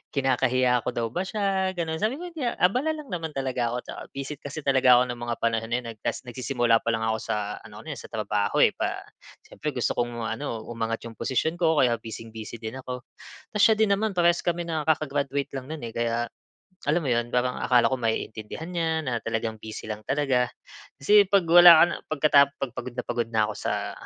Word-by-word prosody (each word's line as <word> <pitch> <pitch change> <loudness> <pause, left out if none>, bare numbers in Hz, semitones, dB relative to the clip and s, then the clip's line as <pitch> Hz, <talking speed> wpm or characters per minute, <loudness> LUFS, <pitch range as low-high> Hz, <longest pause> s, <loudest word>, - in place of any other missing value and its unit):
kinakahiya 130 -2 +2
ko - - +1
daw 115 -1 0
ba 180 - -1
siya, 195 -2 0
gano'n. 160 -2 -2
Sabi 240 +7 0
ko, - - -5
"Hindi 315 -5 -6
ah." - - -1
Abala 250 +13 +2
lang 305 -2 -9
naman 165 -3 -3
talaga 130 -3 -1
ako, - - -3
tsaka - - -8
busy 140 +2 -4
kasi 145 +1 -7
talaga 130 -2 +5
ako 125 - +1
ng 120 - -7
mga 120 0 -2
panahon 115 -1 +1
na - - +2
'yon. 125 - -12
Nag 110 - -15
tapos - - -1
nagsisimula 120 -2 +1
pa - - -14
lang 110 -1 -1
ako 110 0 +1
sa - - -2 0.3
ano - - -12
eh, - - -4
sa - - -10
trabaho, 105 -1 -1
eh. - - +5
Pa - - -3 0.4
siyempre - - -5
gusto - - 0
kong 120 -1 -2
ano 115 0 -4
umangat 115 -1 -2
'yong 115 - -11
posisyon 150 +8 -1
ko 160 -3 +2
kaya 120 -2 +4
bising-busy 110 0 -8
din 110 +2 -5
ako. 125 -1 -6 0.5
Tapos 210 - +1
siya 220 -1 +6
din 220 -1 +3
naman 205 -2 -1
parehas 175 0 +4
kami 175 0 -1
na 160 -2 -2
kaka-graduate 145 -2 -1
lang 135 0 -6
no'n 160 -3 -6
eh, 115 - -9
kaya 115 0 0 0.7
alam 165 +3 +2
mo - - -2
'yon, 120 0 +1
parang 125 0 +1
akala 125 -2 +4
ko 130 - -1
maiintindihan 110 +4 -3
niya, 165 -2 0
na 120 -2 0
talagang 110 0 -2
busy 110 -1 -7
lang 105 -1 -4
talaga. 135 -3 +1 0.5
Kasi 205 +8 +6
'pag 195 -2 +3
wala 175 +1 +10
ka - - +9
na, - - -3
pagkatap 145 -2 +5
'Pag 135 -3 -3
pagod 125 - -6
na 125 - -3
pagod 120 -1 -1
na 110 -2 +2
ko - - -5
sa 100 -1 -2
130 Hz, 220 wpm, -26 LUFS, 115-160 Hz, 0.7 s, wala